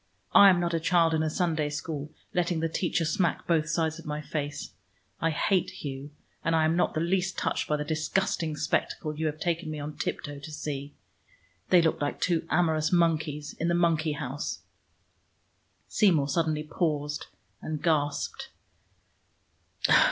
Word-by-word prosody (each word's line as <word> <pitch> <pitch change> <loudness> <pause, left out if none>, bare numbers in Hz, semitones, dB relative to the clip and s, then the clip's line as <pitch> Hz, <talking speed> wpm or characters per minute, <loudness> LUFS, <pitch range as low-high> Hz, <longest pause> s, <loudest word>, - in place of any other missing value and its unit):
I 200 - +9
am 180 -2 +4
not 170 -1 0
a 165 - +2
child 165 0 +3
in 160 - +2
a 155 - +1
Sunday 160 -3 0
school, 150 0 -4 0.2
letting 175 -2 +1
the 165 - +1
teacher 165 0 0
smack 170 +1 0
both 160 -2 +1
sides 160 -1 0
of 165 - -12
my 150 0 -2
face. 145 -1 -4 0.5
I 165 - +2
hate 180 +4 +1
Hugh, 140 0 -6 0.3
and 165 0 +2
I 160 -1 +4
am 160 +1 +2
not 175 - +1
the - - +1
least 185 +2 0
touched - - -1
by 150 - +1
the 150 - -2
disgusting 160 0 -1
spectacle 155 0 -1
you 160 +1 -1
have 155 0 -3
taken 170 0 -1
me 155 -1 -4
on 150 +1 -5
tiptoe 145 -2 -4
to 145 +2 -9
see. 145 -2 -5 0.7
They 175 -2 +6
looked 160 - +1
like 145 - -1
two 165 -2 0
amorous 160 -2 +2
monkeys 160 -4 +1
in 165 - -2
the 170 - +2
monkey 165 -3 +2
house." 140 0 -4 1.2
Seymour 165 -10 +3
suddenly 155 -3 0
paused 150 -2 -2 0.3
and 155 -1 -3
gasped. 145 -3 0
160 Hz, 165 wpm, -28 LUFS, 150-170 Hz, 1.2 s, I